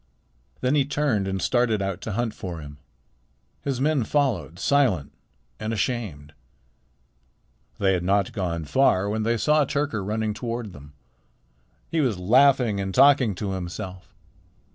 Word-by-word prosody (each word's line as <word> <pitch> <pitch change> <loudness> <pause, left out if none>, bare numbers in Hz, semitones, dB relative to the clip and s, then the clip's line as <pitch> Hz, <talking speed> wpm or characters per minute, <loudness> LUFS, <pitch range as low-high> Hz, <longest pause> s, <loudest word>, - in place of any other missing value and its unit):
Then 130 +2 +1
he 145 -2 +4
turned 140 -8 0
and 95 0 -2
started 120 +1 +1
out 95 -1 -3
to 110 - -4
hunt 120 +1 -1
for 90 -3 -6
him. 75 -1 -10 0.8
His 135 -3 -2
men 145 -1 +2
followed, 110 - -1
silent 120 - +1 0.5
and 110 +1 -3
ashamed. 100 - -3 1.4
They 95 -1 +2
had 90 - 0
not 100 +1 +1
gone 85 -5 -3
far 100 - +2
when 110 +2 -1
they 115 +2 +1
saw 150 +5 +3
Tyrker 140 -7 -2
running 110 +1 -1
toward 115 -2 -5
them. 75 +1 -13 1.0
He 165 - +1
was 120 -9 0
laughing 125 +2 +4
and 95 -1 -3
talking 135 -6 +5
to 100 +1 -3
himself. 90 0 -7
110 Hz, 140 wpm, -24 LUFS, 95-130 Hz, 1.4 s, talking